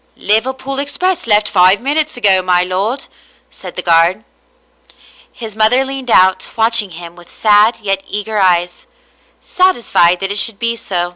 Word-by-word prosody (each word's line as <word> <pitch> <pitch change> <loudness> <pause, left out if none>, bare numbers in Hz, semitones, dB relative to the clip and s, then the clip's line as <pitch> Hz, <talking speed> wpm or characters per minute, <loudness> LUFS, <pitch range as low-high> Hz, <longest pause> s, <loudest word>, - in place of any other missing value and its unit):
"Liverpool 260 +6 -1
express 355 +4 -2
left 210 -1 +3
five 185 0 +3
minutes 295 +3 -1
ago, 195 -5 +3
my 180 -1 +1
lord," 195 +9 -3 0.5
said - - -12
the - - -5
guard. 170 +4 +2 1.1
His 220 -3 -10
mother 225 +5 +2
leaned 270 -2 -7
out, 185 -3 +2
watching 225 -2 +2
him 170 0 -10
with 175 -1 -18
sad, 215 +2 +2
yet 195 -1 -2
eager 210 +1 -4
eyes, 175 -2 0 0.5
satisfied 235 - +1
that 195 0 -3
it 205 - +3
should 225 -2 +1
be 230 +2 -2
so. 175 -5 -4
210 Hz, 150 wpm, -14 LUFS, 185-245 Hz, 1.1 s, left